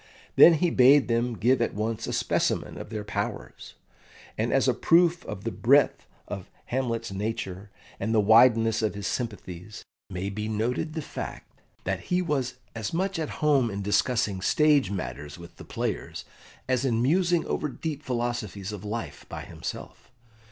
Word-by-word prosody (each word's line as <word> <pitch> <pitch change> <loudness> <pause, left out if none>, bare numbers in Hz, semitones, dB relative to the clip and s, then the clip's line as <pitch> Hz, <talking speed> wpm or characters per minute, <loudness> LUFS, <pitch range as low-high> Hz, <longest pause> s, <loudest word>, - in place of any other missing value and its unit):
Then 170 - +9
he 170 +2 +1
bade 135 +2 +6
them 120 0 0
give 120 +6 +3
at 120 - 0
once 110 +1 -2
a - - -2
specimen - - 0
of - - -8
their 110 -2 -4
powers; 105 - -5 0.6
and - - -1
as - - +3
a - - +4
proof 170 0 +3
of 95 - -7
the 115 - -2
breadth 140 +5 +3 0.2
of 95 -3 -6 0.2
Hamlet's 120 -4 -2
nature, 100 -1 -4 0.3
and 105 +3 -1
the 110 - +4
wideness 115 +1 +5
of 110 -2 -1
his 100 -1 -5
sympathies, 105 -4 -5 0.3
may 95 +2 -4
be 105 +2 -4
noted 115 +8 -1
the 160 -2 -4
fact - - -8 0.2
that - - -1
he 180 - +2
was 140 -8 -1 0.2
as 110 +7 -4
much 190 0 -1
at 155 - -2 0.2
home 140 -6 +4
in 100 -1 -4
discussing 105 -1 +1
stage 150 +1 +3
matters 75 -5 -5
with 85 0 -13
the - - -10
players - - -4 0.4
as 130 -1 +1
in 120 -4 +1
musing 175 +4 +2
over 150 - -2
deep 150 +1 -5
philosophies 120 -7 -3
of 105 -2 -7
life 115 +3 -5
by - - -6
himself. - - -8
115 Hz, 165 wpm, -27 LUFS, 105-140 Hz, 0.6 s, Then